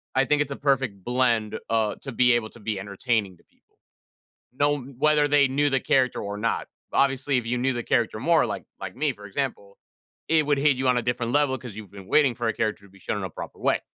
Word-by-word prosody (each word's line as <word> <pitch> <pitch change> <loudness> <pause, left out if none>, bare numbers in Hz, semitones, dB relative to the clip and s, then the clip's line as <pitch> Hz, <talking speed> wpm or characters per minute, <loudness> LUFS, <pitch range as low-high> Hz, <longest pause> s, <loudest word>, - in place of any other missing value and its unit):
I 135 +1 +4
think 150 +3 +2
it's 150 - -2
a - - -3
perfect 130 -9 0
blend, 120 -3 +1
uh, 110 -2 +1
to 135 - -6
be 125 0 +4
able 115 -2 0
to 120 - -15
be 105 -2 -3
entertaining 100 -1 -2
to - - -26
people, - - -40 0.8
no 145 +2 +1 0.2
whether 150 0 +3
they 145 -1 +5
knew 145 +2 +1
the 135 - +2
character 130 -1 +2
or 100 0 -4
not. 115 +3 -1 0.3
Obviously, 135 0 +2
if 120 - -4
you 125 +1 -1
knew 130 +1 +1
the 120 - -3
character 115 -2 +1
more 165 +8 +3
like - - -4 0.2
like - - -7
me, - - +1
for - - -15
example, 485 +1 -4 0.5
it 160 -1 +4
would 145 -1 +2
hit 140 -1 +3
you 130 0 0
on 125 - +3
a - - -1
different 120 0 -1
level 145 -2 +2
'cause 120 -6 -9
you've 105 -3 -10
been 100 -2 -11
waiting 140 -5 +4
for 120 -1 -2
a - - +1
character 105 -2 -2
to - - -21
be 100 - -18
shown 105 - -3
in 100 - -4
a 95 - -4
proper - - -9
way. - - +2
125 Hz, 245 wpm, -25 LUFS, 110-140 Hz, 0.8 s, they